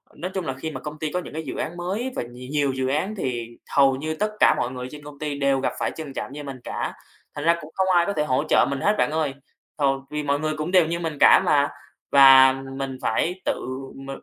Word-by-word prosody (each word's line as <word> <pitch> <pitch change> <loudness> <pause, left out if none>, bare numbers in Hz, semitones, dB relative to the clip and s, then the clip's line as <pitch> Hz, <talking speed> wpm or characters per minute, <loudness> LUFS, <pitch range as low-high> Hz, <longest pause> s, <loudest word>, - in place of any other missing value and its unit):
nói 180 +5 -5
chung 190 -3 -3
là 135 - -2
khi 145 +5 -6
mà 130 - -6
công 150 0 -7
ty 155 -1 -3
có 180 - -1
những 180 - -9
cái 160 +1 -4
dự - - -6
án 175 - -4
mới 200 +9 -3
và - - -2
nhiều 125 +1 -11
nhiều 145 -2 +1
dự 130 0 -1
án, 155 +10 -1
thì 120 - -4 0.2
hầu 135 -1 +5
như 155 +4 -3
tất 210 +5 -1
cả - - +6
mọi 120 - -1
người 125 -1 -6
trên 150 -1 -10
công 145 -1 -11
ty 150 -2 -3
đều 140 -1 +2
gặp 130 - -1
phải - - -1
tình 155 -4 -7
trạng 135 - -5
như 145 0 -7
mình 135 -2 -7
cả. - - -3 0.4
Thành 145 - -4
ra 170 0 +4
cũng 150 - -11
không 190 0 +1
ai 170 -1 +4
có 200 - -1
thể 150 -5 0
hỗ 130 -2 +1
trợ - - +5
mình 140 -1 -3
hết, 205 +1 +3
bạn - - +1
ơi, 155 -3 -1 0.4
th 150 - -2 0.3
vì 150 0 -3
mọi 145 0 0
người 155 0 -1
cũng 155 +3 -3
đều 180 -3 +5
như 170 +1 -2
mình 165 -3 -4
cả - - +7
mà. 145 -1 +3 0.4
Và 135 -1 +8 0.2
mình 135 -1 -4
phải 175 +11 -1
tự - - +2 0.4
m 135 0 -10
150 Hz, 270 wpm, -24 LUFS, 135-165 Hz, 0.4 s, Và